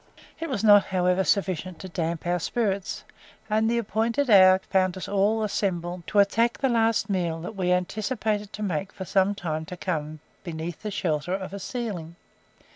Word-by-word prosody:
It 330 0 -4
was 235 -6 -2
not, 205 -2 +7
however, 180 0 +1
sufficient 185 -3 0
to 190 - -8
damp 170 -2 -3
our 175 +1 +1
spirits, 200 0 -2 0.5
and 220 +1 +2
the 235 - +1
appointed 230 +4 0
hour 185 -2 +8
found 185 -1 +1
us 185 - -6
all 205 +2 +1
assembled 175 -4 -2
to - - -2
attack 230 +4 +3
the 270 - +1
last 230 -2 +2
meal 175 -4 -1
that 195 +6 -7
we 180 -2 0
anticipated 210 +3 -1
to 210 - -5
make 190 -1 -2
for 190 - -7
some 195 +2 +2
time 160 -5 -3
to 180 +3 -8
come 155 -4 -3 0.2
beneath 165 -2 -6
the 215 - -4
shelter 180 -3 -1
of 190 0 -6
a 200 - -5
ceiling. 190 -8 -5
190 Hz, 180 wpm, -26 LUFS, 175-215 Hz, 0.5 s, hour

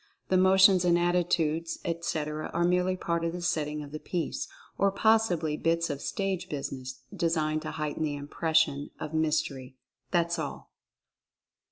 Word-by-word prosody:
The 185 - +4
motions 190 0 +6
and 175 -1 +4
attitudes, 170 -2 +1
etc., 155 -2 -2
are 170 - +2
merely 180 +1 +2
part 170 -2 -1
of 165 0 -1
the 180 - -5
setting 150 -2 -1
of 145 - -10
the 155 - -5
piece, 170 -2 -3 0.3
or 200 0 +2
possibly 195 -7 +2
bits 165 0 +1
of 140 0 -5
"stage 190 -2 -2
business," 130 -2 -5
designed 155 -2 0
to 155 - -5
heighten 150 0 -3
the 150 -2 -1
impression 145 0 +1
of 155 - -5
mys 160 -1 +2
tery. 130 -2 -10 0.3
That's 170 -1 +1
all. - - -6
165 Hz, 155 wpm, -29 LUFS, 150-175 Hz, 0.3 s, motions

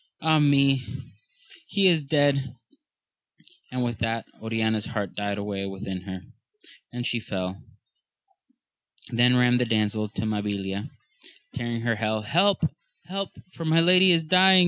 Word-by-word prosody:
Ah 160 -1 +3
me, 140 -2 +4 0.9
he 200 -2 +3
is 165 -4 +3
dead! 140 -3 +1 1.2
and 125 0 -2
with 120 -2 -3
that 115 0 -2 0.2
Oriana's 110 -1 -1
heart 105 -6 -4
died 100 -1 -2
away 100 -1 -4
within 95 -1 -6
her, 95 -1 -7 0.7
and 120 0 -5
she 120 - 0
fell. 95 -3 -5 1.5
Then 120 +1 +4
ran 125 0 +4
the 125 - +1
damsel 110 -1 0
to 105 - -5
MabiHa 100 -2 -3 0.6
tearing 120 -1 -3
her 115 -1 0
hair. 110 0 -1
Help, 185 - +2 0.4
help, 195 +2 -4 0.2
for 165 - -7
my 160 +1 +3
lady 180 +2 +6
is 165 -2 +3
dying. 185 +3 +6
120 Hz, 135 wpm, -25 LUFS, 105-150 Hz, 1.5 s, lady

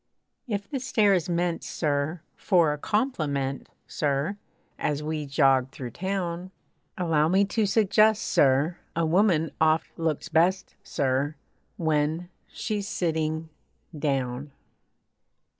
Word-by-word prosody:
If 200 -3 -3
the 275 - -3
stare 220 -5 +3
is 180 -3 0
meant, 175 0 0
sir! 150 +2 -1
For 170 -6 +3
a 150 - -6
compliment, 145 - -1 0.2
sir! 145 +7 -1 0.4
As 150 0 -1
we 155 -1 -3
jog 135 -2 +3
through 130 -2 -7
town, 185 - -3 0.5
Allow 160 -4 +2
me 190 +4 +3
to 210 +1 0
suggest, 215 +1 +3
sir! 140 +5 +2 0.2
A 165 0 +1
woman 165 -2 +3
oft 160 0 +3
looks 160 -3 -1
best, 180 +4 +2
sir! 140 +2 -1 0.4
When 160 +1 0 0.2
she's 210 -2 -3
sitting 160 -2 -1 0.5
down. 135 -2 -2
160 Hz, 115 wpm, -26 LUFS, 145-190 Hz, 0.5 s, stare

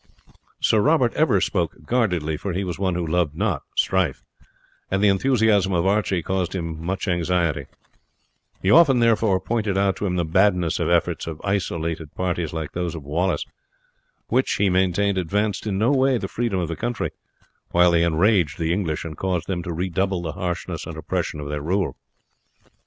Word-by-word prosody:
Sir 110 - +3
Robert 140 -3 +3
ever 125 -11 +3
spoke 90 -3 -1
guardedly, 90 -11 0
for 95 +4 -4
he 95 +3 -1
was 90 -2 -4
one 95 -3 0
who 90 -1 -1
loved 80 -2 0
not 100 +1 -1 0.2
strife, 90 -8 +1 0.7
and 95 - 0
the 105 - +6
enthusiasm 105 -3 +2
of 85 0 +1
Archie 95 -3 +1
caused 95 0 -2
him 80 -3 -4
much 95 +4 -3
anxiety; 85 -5 0 1.0
he 95 - +3
often, 155 -6 +6
therefore, 110 -4 +3
pointed 105 0 -1
out 100 -1 +2
to 105 - -2
him 90 - -1
the 85 -1 0
madness 90 0 +2
of - - 0
efforts - - +1
of 80 -2 -5
isolated 85 -6 -2
parties 90 -3 -2
like 80 -3 -4
those 85 -1 -3
of 80 - -7
Wallace, 85 +7 -1 0.8
which, 130 +1 +1
he 100 -2 +2
maintained, 95 +2 +2
advanced 105 +4 -1
in 100 -2 -1
no 115 +6 +2
way 135 -2 +3
the - - -4
freedom 115 -5 -2
of 85 - -1
the 85 - -4
country, 120 +5 -3 0.6
while 90 0 +4
they 85 -1 +3
enraged 85 -1 +2
the 85 0 0
English 85 -6 -2
and 80 -1 -6
caused 90 -3 -1
them 90 -3 -2
to 85 - -5
redouble 95 +2 -1
the 80 - -3
harshness 90 0 -4
and 80 - -7
oppression 75 0 -3
of 75 - -5
their 75 0 -3
rule. 95 +5 -1
90 Hz, 180 wpm, -23 LUFS, 85-100 Hz, 1.0 s, the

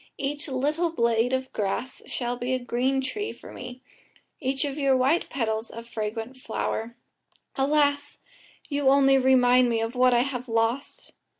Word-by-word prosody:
Each 290 +3 -3
little 295 +6 0
blade 235 -5 +1
of 260 0 -2
grass 210 +5 -3
shall 245 -1 -2
be 245 +1 -2
a - - +1
green 255 +2 0
tree 415 +11 -3
for - - -12
me, 250 +1 -9 0.6
each 265 +2 0
of 285 +1 -4
your 270 -2 +3
white 270 +7 +2
petals 225 -3 -2
a 230 - -8
fragrant 225 +2 -5
flower. 230 -1 -3 0.6
Alas! 285 +1 +1 0.5
you 285 -2 +1
only 270 0 +5
remind 250 -1 +5
me 230 -1 +1
of 225 +1 -2
what 250 -1 +4
I 240 - +4
have 255 -1 -4
lost." 230 +4 -1
255 Hz, 160 wpm, -26 LUFS, 235-275 Hz, 0.6 s, only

